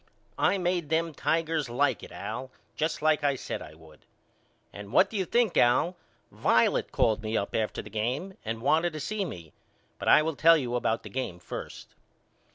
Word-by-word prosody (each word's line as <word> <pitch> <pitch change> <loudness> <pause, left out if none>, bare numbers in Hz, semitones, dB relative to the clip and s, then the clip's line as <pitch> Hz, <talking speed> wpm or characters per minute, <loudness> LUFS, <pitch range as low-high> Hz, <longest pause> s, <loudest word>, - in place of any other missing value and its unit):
I 200 - +3
made 175 -4 -1
them 165 0 0
Tigers 160 -4 0
like 120 - +1
it - - -11
Al 130 - -6 0.3
just 155 -1 -2
like 155 -1 +3
I 140 -1 +2
said - - -5
I 75 - -10
would. 80 -1 -18 0.7
And 100 0 -9
what 190 +10 +4
do - - -7
you 190 -2 0
think, 235 0 +1
Al, 125 +9 +3 0.4
Violet - - +2
called 110 0 +2
me 110 +1 -1
up 100 - -3
after 110 -1 -1
the - - -10
game 130 - -2
and 115 +1 -4
wanted 165 +4 +2
to 155 - -5
see 205 +7 -2
me 85 - -9 0.5
but - - -5
I 155 - +7
will 160 -1 -2
tell 165 +3 +6
you 125 -5 -3
about 115 -2 0
the - - -8
game 125 -9 -3
first. 90 - -8
145 Hz, 190 wpm, -28 LUFS, 115-165 Hz, 0.7 s, I